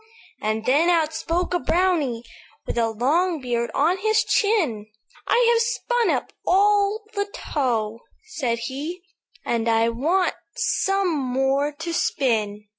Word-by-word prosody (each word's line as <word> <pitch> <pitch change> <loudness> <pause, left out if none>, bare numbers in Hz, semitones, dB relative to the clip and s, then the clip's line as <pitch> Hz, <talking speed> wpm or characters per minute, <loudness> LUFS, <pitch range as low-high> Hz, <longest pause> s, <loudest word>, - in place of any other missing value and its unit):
"And 215 +1 -2
then 300 +7 +3
outspoke 335 +1 0
a 355 - +2
brownie, 320 -10 0 0.4
With - - -4
a 230 -1 +1
long 310 +10 +1
beard 240 -2 -2
on 340 +6 +2
his 435 +2 +2
chin; 325 - +1 0.4
'I 475 0 +4
have 460 - +3
spun 485 0 0
up - - -1
all 410 +2 +3
the 405 -1 -1
tow,' 230 -6 -2 0.3
said 265 - -2
he, 300 +8 -5 0.4
'And 230 -1 0
I 225 0 +3
want 325 +10 +1 0.2
some 390 -6 +1
more 270 +1 0
to 320 +3 -5
spin. 220 - 0
310 Hz, 130 wpm, -23 LUFS, 240-375 Hz, 0.4 s, I